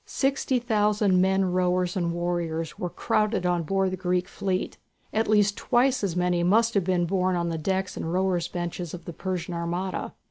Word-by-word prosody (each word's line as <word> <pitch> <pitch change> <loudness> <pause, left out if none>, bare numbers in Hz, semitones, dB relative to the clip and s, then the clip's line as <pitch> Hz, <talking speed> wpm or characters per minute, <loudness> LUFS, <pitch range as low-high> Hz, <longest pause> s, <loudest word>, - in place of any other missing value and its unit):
Sixty 270 -1 0
thousand 210 -5 +2
men 190 +1 +3
rowers 180 0 +1
and 170 -3 0
warriors 170 -2 -2
were 180 - -2
crowded 210 +1 0
on 175 -1 +2
board 190 +3 0
the 185 - -3
Greek 180 0 0
fleet. 190 -2 -3 0.3
At 220 +1 +1
least 205 -1 +3
twice 250 0 +2
as 185 -4 -1
many 180 -1 +1
must 225 +6 +3
have 200 - +2
been 180 -2 +1
borne 185 +1 +1
on 170 -1 -1
the 165 -1 -3
decks 190 +3 -1
and 160 - -4
rowers' 180 -2 +1
benches 175 -1 -4
of 175 - -12
the 170 - -6
Persian 180 0 -4
armada. 175 +2 -3
185 Hz, 185 wpm, -26 LUFS, 175-200 Hz, 0.3 s, men